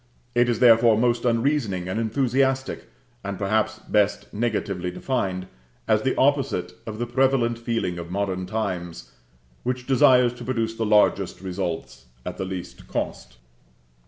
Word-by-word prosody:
It 120 0 +3
is 120 - +1
therefore 115 -2 +6
most 120 +1 +1
unreasoning 115 -6 +1
and 95 +4 -2
enthusiastic, 130 +3 0 0.3
and 100 -1 -4
perhaps 110 +2 0
best 105 -1 0
negatively 100 -5 -1
defined, 95 -3 -2 0.4
as 110 -1 +3
the 130 - 0
opposite 135 -11 +1
of 110 -1 -5
the 120 - -2
prevalent 120 -1 +1
feeling 115 -7 -2
of 85 0 -7
modern 95 -1 -2
times, 90 - -4 0.5
which 125 0 -3
desires 125 -2 +5
to 120 - -10
produce 115 -2 -1
the 115 -1 -2
largest 105 0 +3
results 90 -9 -5 0.2
at - - -5
the 95 - -3
least 95 -2 -7
cost. 60 0 -4
110 Hz, 140 wpm, -24 LUFS, 95-120 Hz, 0.5 s, therefore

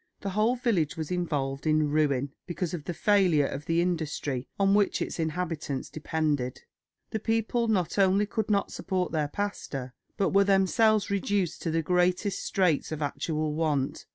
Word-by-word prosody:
The 200 - -3
whole 215 +5 +2
village 195 - 0
was 160 0 -4
involved 145 -5 -2
in 155 -1 +2
ruin 140 -3 +1 0.2
because 175 -1 -3
of 160 -4 -5
the 175 - -3
failure 185 -8 +3
of 140 +2 -5
the 165 +1 +2
industry 155 -6 -2
on 195 0 +4
which 205 -1 +2
its - - -4
inhabitants 160 -4 -3
depended. 150 -5 -2 0.5
The 220 - -1
people 225 +2 0
not 200 -3 0
only 195 +1 +4
could 215 +1 -3
not 200 -1 +1
support 185 -2 -2
their 155 -2 0
pastor, 145 -9 -4 0.2
but 195 - +2
were 200 0 +6
themselves 200 +2 +3
reduced 200 -3 0
to - - -2
the 165 0 0
greatest 180 +3 +1
straits 180 -7 +1
of 155 -1 -3
actual 155 +1 -2
want. 150 -4 -1
175 Hz, 165 wpm, -28 LUFS, 150-200 Hz, 0.5 s, were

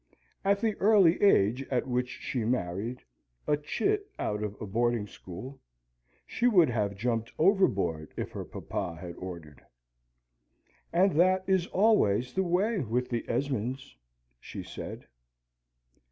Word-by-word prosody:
At 200 0 +2
the 220 -2 +1
early 195 -4 +5
age 125 - +4
at 125 -2 0
which 125 0 -1
she 125 -2 -4
married 110 +1 -2 0.4
a 150 - +3
chit 400 - -1
out 105 0 -2
of 105 -1 -4
a 110 - -5
boarding 115 +1 0
school 105 +8 -10 0.7
she 245 - 0
would 175 - +5
have 105 -4 -1
jumped 115 +1 -1
overboard 100 - +2
if - - -4
her - - -5
papa 90 -4 -5
had 85 -1 -7
ordered. 85 -6 -9 1.3
"And 190 +3 +4
that 185 +1 +4
is 190 -2 +2
always 125 - +2
the 190 - +1
way 190 +5 +1
with 125 -2 -1
the 120 -2 -2
Esmonds," 130 - -2 0.4
she - - -8
said. - - -8
125 Hz, 135 wpm, -29 LUFS, -, 1.3 s, early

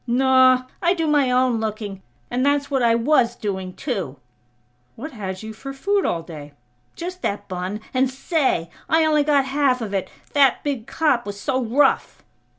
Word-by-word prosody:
"Naw; 255 +1 +4 0.2
I 350 +1 +3
do 330 -2 -1
my 295 -4 +3
own 250 -2 +2
looking. 210 -3 -4 0.3
And 250 +1 0
that's 285 0 +1
what 270 -2 +1
I 230 -1 +4
was 240 -1 +2
doing, 190 -3 -4
too!" 190 - -4 0.8
"What 305 +8 -7
had 190 -5 -6
you 220 0 -7
for 275 +5 -8
food 400 +8 0
all 165 -1 -1
day?" 150 -3 -10 0.4
"Just 365 +2 -6
that 205 0 -3
bun. 185 +3 -4
And 260 0 +2
say!! 265 - -1 0.2
I 320 0 +4
only 305 -1 +3
got 285 -2 +3
half 270 -2 +1
of 215 -4 -5
it! 195 -2 -2 0.2
That 275 -3 +4
big 270 -6 -3
cop 280 -8 +1
was 205 0 -6
so 260 +3 -1
rough!" 245 +6 +1
255 Hz, 175 wpm, -22 LUFS, 210-285 Hz, 0.8 s, Naw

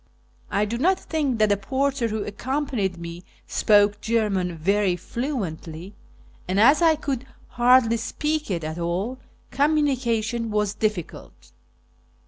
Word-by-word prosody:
I 205 +1 +1
do 235 +3 -3
not 370 +7 +3
think 290 -6 -1
that 215 -1 +3
the 205 - +3
porter 265 +3 -1
who 215 -1 -3
accompanied 235 -4 -2
me 170 +1 -8 0.2
spoke 205 0 +3
German 200 -6 0
very 195 +2 +1
fluently, 185 - -5 0.5
and, 185 +2 0
as 275 +9 +6
I 325 -2 +5
could 275 -4 -4 0.2
hardly 240 -1 +4
speak 300 +6 -2
it 170 -4 -2
at 155 +2 -4
all, 185 +10 -2 0.3
communication 250 -6 +1
was 210 -1 0
difficult. 175 - -4
220 Hz, 125 wpm, -24 LUFS, 195-265 Hz, 0.5 s, as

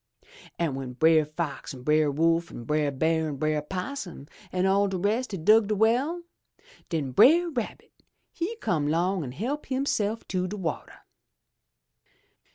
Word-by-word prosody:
An' 170 -1 0
w'en 135 -2 -5
Brer 160 +4 +4
Fox 155 -2 -5
an' 125 - -11
Brer 150 +1 +3
Wolf 165 +3 +1
an' 120 - -8
Brer 150 +3 +1
Bear 160 +3 0
an' 150 - -4
Brer 155 +2 0
'Possum 185 - -6 0.3
an' 180 0 0
all 200 +1 +3
de 190 -1 -2
rest 215 +7 0
had 175 -5 -6
dug 215 0 +6
de 215 - 0
well, 255 - +1 0.7
den 150 -6 -2
Brer 335 - +5
Rabbit 240 -7 -5 0.4
he 365 +7 -3
come 160 - -1
'long 175 +3 +1
an' 125 - -6
help 255 - -4
hisself 230 -5 -1
to 185 -1 -1
de 205 +3 -5
wateh. 170 -6 -4
175 Hz, 160 wpm, -27 LUFS, 155-220 Hz, 0.7 s, dug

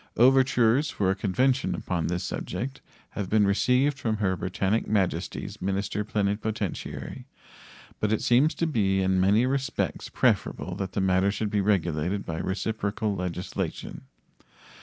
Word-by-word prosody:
Overtures 130 +2 +4
for 95 -7 0
a - - 0
convention 125 +7 +1
upon 85 -3 -2
this 90 +1 -2
subject 125 +9 -4 0.3
have 100 -3 -4
been 105 -1 +4
received 125 +7 +2
from 110 -2 -1
Her 95 -3 +1
Britannic 95 +5 -1
Majesty's 100 -4 -1
minister 100 +2 -1
plenipotentiary, 105 -1 -3 0.7
but 105 - 0
it 110 - 0
seems 130 +6 +4
to 165 - 0
be 95 -10 +1
in 95 0 +2
many 105 +6 +4
respects 135 -1 -2
preferable 90 - 0
that 95 -2 -4
the 100 - 0
matter 95 +1 +3
should 105 0 -3
be 105 - +2
regulated 90 -1 0
by 80 -1 -4
reciprocal 105 +1 -2
legislation. 90 -1 -4
105 Hz, 140 wpm, -27 LUFS, 95-115 Hz, 0.7 s, Overtures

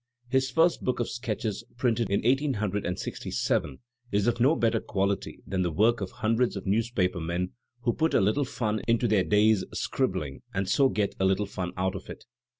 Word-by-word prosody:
His 130 +1 +2
first 165 +5 +2
book 125 - 0
of 120 - -1
sketches, 110 -3 -3
printed 120 -3 +1
in 100 - +1
1867, 105 - -1 0.3
is 100 0 +2
of 120 0 +1
no 135 +7 +4
better 115 -1 +2
quality 100 -1 -2
than 95 -1 -1
the 90 - +1
work 110 +8 +2
of 95 - -3
hundreds 115 +2 0
of 100 - -6
newspaper 100 -3 +1
men 85 +2 -2 0.3
who 120 -1 +1
put 160 0 +1
a - - +6
little 105 +9 +2
fun 110 -4 -2
into 115 +1 +3
their 105 -4 +3
day*s 105 0 +3
scribbling 70 -2 -2
and 95 0 0
so 135 +7 +4
get 105 -4 0
a 95 - +2
little 95 +2 +2
fun 95 -3 -4
out 95 0 0
of 95 - -8
it. - - -9
105 Hz, 185 wpm, -28 LUFS, 95-120 Hz, 0.3 s, a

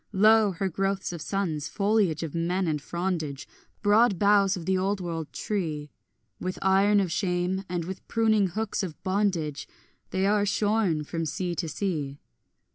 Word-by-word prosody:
Lo 215 +2 +5
her 190 +3 -1
growths 195 +1 -1
of 170 - -6
sons, 160 -5 -2
foliage 200 -6 +1
of 160 - -5
men 175 +3 0
and 150 -2 -1
frondage, 165 -4 -3 0.4
Broad 210 0 +4
boughs 200 0 +4
of 170 - -7
the 190 - +2
old 195 +2 0
world 165 -4 -4
tree, 155 -8 -3 0.5
With 185 0 -3
iron 195 +2 +4
of 190 -4 0
shame 180 +1 0
and 175 -2 -2
with 190 +1 -7
pruning 220 -3 +3
hooks 215 +4 -2
of 180 -6 -5
bondage 185 -7 -1 0.4
They 190 +1 0
are 205 +1 +3
shorn 205 -5 +1
from 165 +2 -3
sea 175 +4 -2
to 170 -1 -3
sea. 150 -7 -3
185 Hz, 160 wpm, -27 LUFS, 165-200 Hz, 0.5 s, Lo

